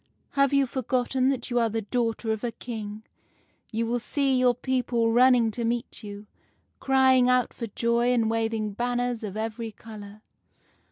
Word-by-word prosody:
' - - -42
Have 275 -1 +2
you 275 -1 +4
forgotten 255 +1 0
that 260 -2 -3
you 240 - +2
are 230 -1 +2
the 225 0 -3
daughter 230 0 -1
of 220 +1 -3
a 240 - -1
King? 220 -2 -7 0.7
You 230 0 -1
will 240 +1 -1
see 270 +2 0
your 250 -1 +3
people 245 -2 0
running 245 -1 +5
to 235 +2 -4
meet 235 +1 -2
you, 205 0 -8 0.5
crying 260 -2 +4
out 250 -1 +2
for 230 - -5
joy 235 +3 +1
and 235 -3 +2
waving 225 -2 -1
banners 245 +1 -1
of 210 -1 -5
every 225 +1 -4
color. 210 -1 -11
235 Hz, 170 wpm, -26 LUFS, 225-250 Hz, 0.7 s, running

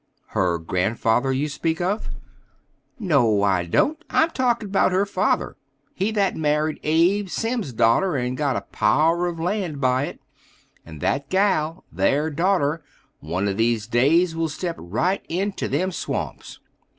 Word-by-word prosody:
"Her 90 -3 +1
grandfather 110 +9 0
you 135 +3 0
speak 160 +2 -2
of?" 190 +5 -1 0.9
"No, 125 - +2
I 95 -3 +1
don't: 310 - +1
I'm 320 +1 +2
talking 235 -6 0
'bout 195 -1 +2
her 190 +2 +2
father, 205 +1 -1 0.4
he 195 +3 -1
that 200 -3 +1
married 150 0 0
Abe 175 +6 +2
Simm's 225 - -2
da'ter 120 - +2
and 125 -1 -1
got 140 -2 0
a - - -1
power 165 +4 +1
of 170 -1 -4
land 175 -4 -2
by 130 +1 +2
it; - - -8 0.6
and 80 -3 -11
that 140 0 -1
gal, 185 -5 +1
their 140 - +1
da'ter, 165 -1 +1 0.4
one 85 +7 -2
of 100 -1 -2
these 115 -2 +1
days 155 +9 +3
will 165 0 -1
step 170 +3 -4
right 145 - -1
into 195 +4 -2
them 180 +7 0
swamps." - - -5
155 Hz, 150 wpm, -23 LUFS, 125-190 Hz, 0.9 s, days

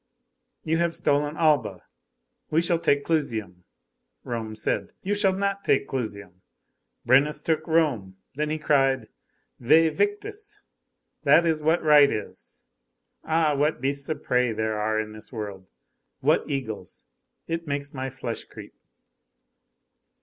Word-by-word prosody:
You 160 +1 0
have 170 -1 +1
stolen 145 +1 0
Alba, 135 - +1 0.7
we 155 - +2
shall 170 0 +2
take 140 -3 +1
Clusium.' 110 - -2 0.6
Rome 115 -2 -5
said: 110 - -2
'You 200 - 0
shall 205 -2 +2
not 200 +1 -2
take 135 - +2
Clusium.' 100 -7 -5 0.6
Brennus 140 +5 +4
took 160 0 0
Rome. 135 - +1 0.2
Then 150 +2 -2
he 155 - -1
cried: 135 -6 +1 0.5
'Væ 160 +6 +5
victis!' 415 - -3 0.6
That 170 - +5
is 160 -2 +1
what 160 +3 +2
right 150 -2 +7
is. 105 - -7 0.6
Ah! 160 -1 +2
what 150 +3 +1
beasts 140 +2 -1
of 155 - -3
prey 125 -1 +1
there 110 -1 -2
are 110 +1 0
in 110 0 -4
this 110 - -11
world! 100 -5 -7 0.5
What - - +1
eagles! 110 - -5 0.4
It 165 0 -3
makes 140 0 -3
my 135 -1 -4
flesh 125 -3 -6
creep." - - -12
140 Hz, 135 wpm, -25 LUFS, 110-160 Hz, 0.7 s, right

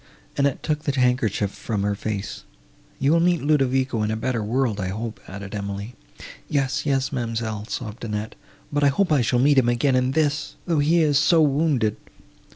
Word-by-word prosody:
Annette 140 -1 0
took 150 -1 -1
the 140 -3 -1
handkerchief 120 -5 +1
from 105 -1 -3
her 100 0 +1
face. 100 0 -4 0.5
"You 135 +2 +2
will 165 - +4
meet 175 -2 +2
Ludovico 135 -5 +1
in 105 - 0
a 110 - -1
better 115 0 -2
world, 115 -1 0
I 95 - -2
hope," 110 +3 -5
added 100 +1 -8
Emily. 100 +2 -5 0.6
"Yes—yes,—ma'amselle," 125 -6 -1
sobbed 110 -1 -5
Annette, 105 -1 -4 0.4
"but 145 0 +1
I - - +6
hope 170 +6 +1
I 145 -4 +4
shall 120 +1 +1
meet 140 +2 +5
him 120 -2 +2
again 130 +3 +2
in 130 +1 +1
this—though 155 +2 -1
he 160 +4 +3
is 145 -2 +3
so 160 +2 +4
wounded!" 140 -7 +1
130 Hz, 170 wpm, -23 LUFS, 110-145 Hz, 0.6 s, I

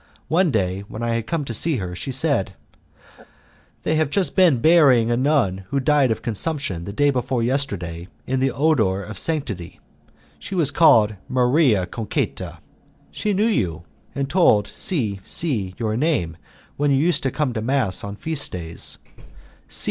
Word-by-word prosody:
One 175 +2 +3
day, 95 -7 0
when 110 +3 -7
I 120 - -1
had 115 -1 -2
come 165 -4 -2
to 120 - -5
see 155 +7 +1
her, 90 -4 -5
she 115 - -6
said, 130 - 0 1.3
"They - - 0
have 155 -2 +1
just 190 +4 0
been 180 -8 +5
burying 130 -5 +4
a - - +2
nun 120 -9 +1
who 140 - 0
died 145 -1 +3
of 110 - -2
consumption 115 - -2
the 100 - -5
day 145 +7 +2
before 125 -2 -1
yesterday 95 -10 -2 0.2
in 130 0 -1
the 135 +1 +2
odour 115 -9 +1
of 110 +2 -5
sanctity. 110 - -3 0.6
She 195 - -7
was 155 -6 +2
called 115 -9 +5 0.2
'Maria 125 - +3
Concetta.' 110 +2 -4 0.5
She 210 - -2
knew 205 +2 +1
you, 90 - -1 0.3
and 140 -1 -1
told 135 - +3
C 110 - -2
C 105 - -1
your 110 -2 -2
name 120 - 0 0.4
when 145 0 +1
you 135 - +3
used 155 +1 +1
to 135 - 0
come 140 -2 -2
to 110 - -3
mass 115 -6 0
on 100 0 -6
feast 155 +5 -3
days. 85 -2 -3
130 Hz, 165 wpm, -22 LUFS, 100-150 Hz, 1.3 s, been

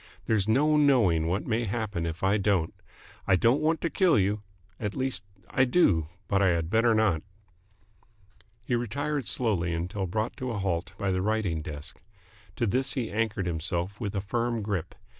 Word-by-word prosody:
"There's 110 -3 +1
no 150 +7 +3
knowing 115 - +4
what 90 +4 -1
may 115 +1 0
happen 100 -5 -2
if 80 +2 -6
I 100 +2 +3
don't. 95 -5 +1 0.5
I 95 - +5
don't 120 - +3
want 160 +1 +1
to 165 - 0
kill 185 -4 +4
you. 100 +1 +1 0.4
At 105 -2 -3
least, 130 -6 -1 0.2
I 130 - +2
do, 110 - +3 0.2
but 100 0 +2
I 100 - +4
had 85 -1 0
better 115 0 +4
not." 105 -8 +2 1.4
He 125 - -2
retired 135 +3 -1
slowly 95 -7 +1
until 90 +3 -3
brought 110 +5 -2
to 130 - -3
a 115 - -3
halt 95 -1 -2
by 100 -1 -1
the 95 0 0
writing 100 -6 0
desk. 75 -2 -8 0.5
To 120 - 0
this 130 +5 0
he 125 -5 -2
anchored 105 -3 -1
himself 85 +4 -2
with 105 -2 -3
a 100 - 0
firm 115 +2 -1
grip. 95 -5 -3
105 Hz, 180 wpm, -28 LUFS, 90-120 Hz, 1.4 s, I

